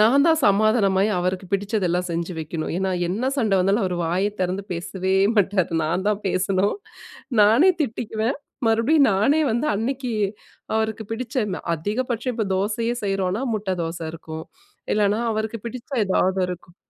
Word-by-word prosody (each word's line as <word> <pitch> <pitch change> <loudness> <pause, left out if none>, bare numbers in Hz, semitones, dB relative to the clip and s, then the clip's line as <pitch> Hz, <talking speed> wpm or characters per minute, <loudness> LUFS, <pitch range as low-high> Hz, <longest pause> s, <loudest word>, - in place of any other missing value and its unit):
நான் 255 +7 +5
தான் 320 -1 +4
சமாதானமாயி 205 -1 +3
அவருக்கு 185 +1 -2
பிடிச்சதெல்லாம் 190 -3 0
செஞ்சு 170 +1 -3
வைக்கணும். 155 +1 -4
ஏன்னா 190 -1 0 0.2
என்ன 230 +9 -1
சண்ட 215 -5 +2
வந்தாலும் 195 +3 +2
அவர் 180 -1 -1
வாய 190 +5 0
திறந்து 185 +2 -2
பேசவே 190 +2 -2 0.2
மாட்டாரு. 195 -3 +2
நான்தான் 200 +6 0
பேசணும், 190 - +1 0.7
நானே 240 - +6
திட்டிக்குவேன். 225 0 -2 0.3
மறுபடியும் 250 +7 +4
நானே 275 +11 +3
வந்து 240 +6 0
அன்னைக்கு, 250 +2 -2 0.6
அவருக்கு 220 0 -1
பிடிச்ச 245 +3 -5 0.4
அதிகபட்சம் 240 - -2
இப்ப 220 -2 -1
தோசையே 225 +4 0
செய்கிறோம்னா, 195 +3 -1
முட்ட 205 -2 -3
தோசை 165 0 -4
இருக்கும். 160 -1 -8 0.5
இல்லனா 210 0 +2
அவருக்கு 220 +1 -2
பிடிச்ச 235 +1 -7 0.2
ஏதாவது 190 0 +1
இருக்கும். 175 -1 -8
205 Hz, 135 wpm, -23 LUFS, 185-230 Hz, 0.7 s, நானே